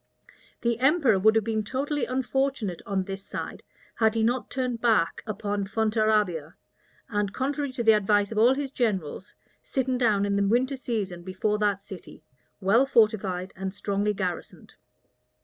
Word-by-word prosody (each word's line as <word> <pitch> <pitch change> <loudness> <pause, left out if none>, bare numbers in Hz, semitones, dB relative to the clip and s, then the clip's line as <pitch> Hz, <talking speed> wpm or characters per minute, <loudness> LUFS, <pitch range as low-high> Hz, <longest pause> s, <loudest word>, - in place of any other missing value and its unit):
The 235 -1 0
emperor 270 - +4
would 220 +3 +4
have 225 - +3
been 220 0 -1
totally 275 +5 -2
unfortunate 260 -6 -1
on 195 -2 0
this 195 +1 -6
side, - - -6 0.3
had 220 -1 +2
he 225 - +1
not 240 +3 0
turned 250 -3 -2
back 220 -8 +2
upon 205 -1 -2
Fontarabia, 215 -6 0 0.5
and, 205 -2 -1
contrary 280 +4 -2
to 250 -2 -2
the 225 - +7
advice 205 -1 +2
of 215 - -1
all 245 +4 +5
his 275 -1 -3
generals, 195 - -2 0.3
sitten 260 -1 -1
down 210 -5 +2
in 200 0 0
the 200 0 +2
winter 255 +6 +2
season 210 -9 -3
before 190 +4 -1
that 200 -2 0
city, 190 -3 -11 0.4
well 220 +7 +3
fortified 200 -7 +1
and 190 +1 -5
strongly 205 +1 -1
garrisoned. 180 -3 -5
215 Hz, 155 wpm, -26 LUFS, 195-245 Hz, 0.5 s, the